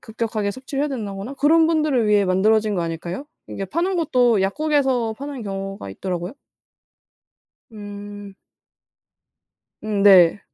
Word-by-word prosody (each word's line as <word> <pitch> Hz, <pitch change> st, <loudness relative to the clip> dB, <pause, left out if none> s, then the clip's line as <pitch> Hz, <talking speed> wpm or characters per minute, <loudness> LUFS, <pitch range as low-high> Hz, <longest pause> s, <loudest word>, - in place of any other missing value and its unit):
급격하게 220 Hz, -2 st, -3 dB
섭취를 270 Hz, +5 st, -4 dB
해야 300 Hz, -, 0 dB
된다거나 220 Hz, -1 st, -5 dB
그런 320 Hz, +3 st, +4 dB
분들을 305 Hz, -8 st, +1 dB
위해 205 Hz, -1 st, +4 dB
만들어진 210 Hz, +3 st, +2 dB
거 175 Hz, -, -1 dB
아닐까요? 170 Hz, -, -5 dB, 0.2 s
이게 195 Hz, -, -5 dB
파는 355 Hz, -, -1 dB
것도 250 Hz, -, +2 dB
약국에서 260 Hz, 0 st, 0 dB
파는 280 Hz, -3 st, -6 dB
경우가 195 Hz, -, -6 dB
있더라고요. 180 Hz, -, -4 dB, 1.4 s
음. 205 Hz, -1 st, -9 dB, 1.5 s
음 210 Hz, -2 st, -1 dB
네. 190 Hz, -1 st, +6 dB
215 Hz, 295 characters per minute, -21 LUFS, 195-270 Hz, 1.5 s, 네